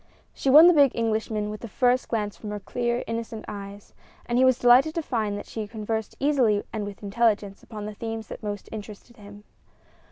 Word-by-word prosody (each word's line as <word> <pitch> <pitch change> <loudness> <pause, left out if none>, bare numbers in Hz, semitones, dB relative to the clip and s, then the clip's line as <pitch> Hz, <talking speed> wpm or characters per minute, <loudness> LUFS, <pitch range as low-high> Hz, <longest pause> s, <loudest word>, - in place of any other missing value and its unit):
She 270 - -2
won 300 +5 +9
the 355 - +7
big 285 -4 +5
Englishman 220 -2 -1
with 215 - -8
the 235 - -6
first 250 +4 +1
glance 210 -4 -2
from 210 +5 -8
her 210 0 -4
clear, 240 +4 -2
innocent 230 -1 -5
eyes, 200 0 -9 0.3
and 240 +1 0
he - - +5
was 260 -2 +4
delighted 255 +6 +5
to 330 - -1
find 215 -7 -2
that 205 - -7
she 220 -2 -6
conversed 220 0 -4
easily 255 -8 +2
and 215 -2 -3
with 200 0 -10
intelligence 205 -1 0
upon 210 -2 -8
the 210 - -6
themes 225 +1 -5
that - - -8
most 205 -2 -5
interested 215 +2 -9
him. 205 0 -13
220 Hz, 200 wpm, -25 LUFS, 205-240 Hz, 0.3 s, won